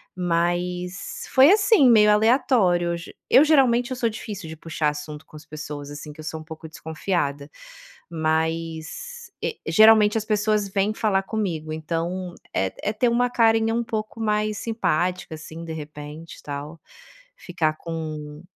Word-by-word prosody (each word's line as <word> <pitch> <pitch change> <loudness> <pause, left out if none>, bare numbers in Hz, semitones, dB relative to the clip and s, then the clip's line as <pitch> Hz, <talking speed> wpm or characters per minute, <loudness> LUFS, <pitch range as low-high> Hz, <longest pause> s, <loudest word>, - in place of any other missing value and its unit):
mas 180 +1 -2
foi 270 +5 +7
assim, 400 - +5
meio 210 -2 +6
aleatório. 210 -6 +3
G 170 - -11
eu, 275 - +7
geralmente, 255 -5 +4
eu - - -1
sou 235 -2 +1
difícil 205 -4 -7
de 160 - -8
puxar 155 -1 -1
assunto 150 0 -7
com - - -18
as 150 - -14
pessoas, 150 -2 -7
assim, 145 +1 -8
porque 150 - -16
eu - - -10
sou 160 0 -4
um - - -11
pouco 160 0 -9
desconfiada. 155 -3 -3 0.6
Mas, 160 - -3
e - - -3
geralmente, 215 -1 +6
as 215 - -4
pessoas 210 -1 +1
vêm 195 +2 0
falar 205 -3 +1
comigo, 175 -8 -3
então 170 +3 -3 0.2
é 95 - +1 0.2
é - - -2
ter 240 +3 +2
uma 245 +1 +2
carinha 225 -1 +3
um 235 - +1
pouco 220 0 -4
mais 215 -1 0
simpática, 180 -6 -1
assim, 160 +2 -9
de 165 - -6
repente 150 0 -9
e - - -15
tal, 145 +3 -7 0.6
ficar 155 - -1
com 155 -2 -6
180 Hz, 160 wpm, -24 LUFS, 155-220 Hz, 0.6 s, foi